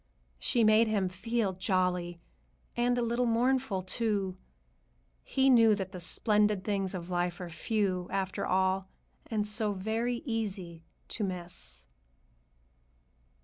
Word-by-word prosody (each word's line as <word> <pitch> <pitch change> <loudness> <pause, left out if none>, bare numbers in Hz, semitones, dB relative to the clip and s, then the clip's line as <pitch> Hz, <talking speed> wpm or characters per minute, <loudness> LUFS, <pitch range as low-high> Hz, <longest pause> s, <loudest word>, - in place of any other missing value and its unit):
She 235 - +2
made 215 +1 +5
him 200 -4 +1
feel 210 +2 -1
jolly, 180 -2 0 0.6
and 245 +1 +2
a 245 - +1
little 235 +1 +1
mournful, 235 -4 +1
too. 195 -1 -1 0.9
He 265 0 +2
knew 230 -4 +6
that 190 -2 -4
the 185 - -7
splendid 210 +2 +2
things 195 -3 -1
of 175 0 -6
life 175 0 -1
are 180 -2 -6
few, 185 -2 -1
after 190 -1 -2
all, 190 0 +1 0.4
and 210 -2 -1
so 210 0 +1
very 225 +6 -2
easy 195 - -3 0.3
to 220 - -2
miss. 180 -2 -5
205 Hz, 125 wpm, -30 LUFS, 185-225 Hz, 0.9 s, knew